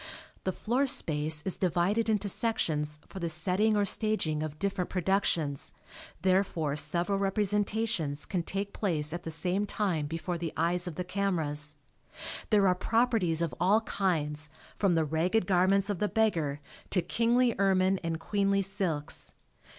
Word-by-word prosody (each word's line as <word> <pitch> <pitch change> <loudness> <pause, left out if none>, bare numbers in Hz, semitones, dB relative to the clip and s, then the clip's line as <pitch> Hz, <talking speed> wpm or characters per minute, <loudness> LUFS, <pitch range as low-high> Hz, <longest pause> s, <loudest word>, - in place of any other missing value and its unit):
The 190 - +1
floor 250 +9 0
space 155 - +2
is 190 - -2
divided 190 +5 +1
into 210 -2 +1
sections 155 -9 0
for 190 - -9
the 170 -2 -2
setting 185 +6 +2
or 205 - +2
staging 200 -8 +1
of 155 -1 -4
different 190 0 -2
productions, 175 -6 0 0.5
therefore 185 -6 +1
several 170 +7 +1
representations 205 -5 0
can 180 -4 -1
take 195 +3 -4
place 155 -6 0
at 175 - -4
the 165 - -6
same 180 +6 -1
time 180 -9 -1
before 165 +2 -4
the 165 -1 -4
eyes 175 +2 +1
of 170 - -5
the 180 - -3
cameras. 160 -6 -1 0.7
There 205 -2 +4
are 180 - +5
"properties" 215 -5 +1
of 165 - -2
all 195 +6 +4
kinds 155 -8 -1 0.3
from 195 -4 +2
the 160 -1 +2
ragged 175 +7 +1
garments 195 +1 +3
of 205 -4 -2
the 210 - +1
beggar 165 -10 0 0.3
to 180 - +1
kingly 235 +5 +2
ermine 190 -1 +3
and 165 -1 -2
queenly 200 +2 +1
silks. 185 -7 -1
185 Hz, 150 wpm, -29 LUFS, 160-200 Hz, 0.7 s, are